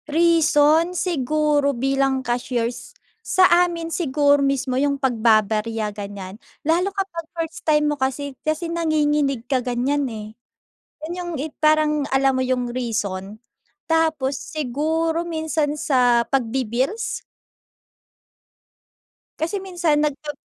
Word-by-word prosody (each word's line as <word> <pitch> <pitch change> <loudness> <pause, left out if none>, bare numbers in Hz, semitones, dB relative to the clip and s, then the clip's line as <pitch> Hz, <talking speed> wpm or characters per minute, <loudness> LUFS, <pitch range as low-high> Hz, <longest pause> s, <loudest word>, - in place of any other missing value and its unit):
Reason, 325 +1 +3
siguro 300 -4 +1
bilang 270 0 0
cashiers. 240 0 -3 0.2
Sa 375 -4 +4
amin 345 -2 +2
siguro 285 -3 +2
mismo 275 -2 0
yung 280 +2 +1
pagbababarya 220 -3 +1
ganyan. 200 0 -8 0.2
Lalo 345 +5 +2
kapag 385 -4 -4
first 325 -1 -4
time 300 -2 +2
mo - - -3
kasi 270 +2 -2
kasi 310 +2 -1
nanginginig 295 -6 +1
ka 255 -1 0
ganyan, 255 +3 -1
eh. 215 -1 -8 0.7
Ganyang, 345 0 -5
eh, 310 +1 -4
parang 305 -1 +3
alam 270 0 +3
mo - - +1
'yung 250 -1 -1
reason, 210 -5 -3 0.5
tapos 315 -5 +1
siguro 315 +4 -1
minsan 315 -2 -1
sa 245 -5 +3
pagbi-bills. 260 - -1 2.2
Kasi 335 +6 -1
minsan 345 -5 +1
nagpap 295 0 -3
285 Hz, 110 wpm, -22 LUFS, 250-320 Hz, 2.2 s, Sa